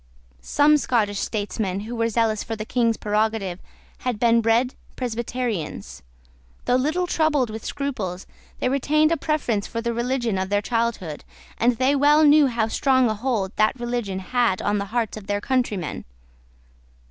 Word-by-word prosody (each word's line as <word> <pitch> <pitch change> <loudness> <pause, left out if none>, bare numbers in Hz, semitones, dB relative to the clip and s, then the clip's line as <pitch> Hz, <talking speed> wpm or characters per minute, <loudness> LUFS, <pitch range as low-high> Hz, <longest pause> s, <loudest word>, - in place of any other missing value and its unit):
Some 295 - +4
Scottish 210 -7 0
statesmen 205 -2 -2
who 225 +3 -6
were 230 0 0
zealous 220 -1 +1
for 225 - -4
the 215 0 -6
King's 230 -1 +1
prerogative 210 -3 -1 0.4
had 250 -3 -2
been 235 0 +4
bred 230 +3 +2 0.2
Presbyterians. 235 - -4 0.6
Though - - +1
little 310 +8 +1
troubled 305 -8 +1
with 220 0 -7
scruples, 205 -11 -4 0.3
they - - 0
retained 300 +4 +2
a - - +4
preference 265 -10 -1
for 230 - -4
the 235 0 -2
religion 240 -3 -1
of 190 0 -2
their 205 0 +2
childhood; 230 -10 -2 0.4
and 240 0 +2
they 260 +3 +2
well 295 +2 +5
knew 295 -1 +6
how 230 -3 0
strong 260 0 +2
a - - 0
hold 215 -4 -2
that 215 +4 +2
religion 240 -5 -2
had 230 0 0
on 205 0 0
the 200 - -2
hearts 225 +1 -2
of 205 -2 -10
their 205 0 0
countrymen. 205 - -2
230 Hz, 160 wpm, -23 LUFS, 210-255 Hz, 0.6 s, knew